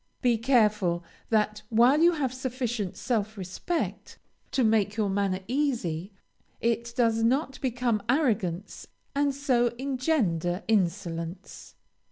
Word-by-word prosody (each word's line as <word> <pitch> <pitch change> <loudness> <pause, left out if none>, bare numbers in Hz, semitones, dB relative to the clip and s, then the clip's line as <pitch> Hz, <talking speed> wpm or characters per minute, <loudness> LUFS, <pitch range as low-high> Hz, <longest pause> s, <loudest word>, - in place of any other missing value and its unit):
Be 245 -2 +4
careful 210 -8 +2 0.3
that 215 -1 +1
while 240 +5 +5
you 345 +1 +6
have 270 -6 -1
sufficient 245 -6 -3
self 220 -3 -1
respect 190 - -4 0.3
to 260 - +1
make 215 -2 +2
your 205 -3 +1
manner 195 -1 0
easy, 230 - -1 0.5
it 235 0 0
does 225 -2 +2
not 265 +4 +1
become 245 -4 0
arrogance 210 - 0 0.3
and 285 0 +2
so 265 -3 +2
engender 250 - 0
insolence. 175 -3 -2
225 Hz, 115 wpm, -27 LUFS, 200-255 Hz, 0.5 s, you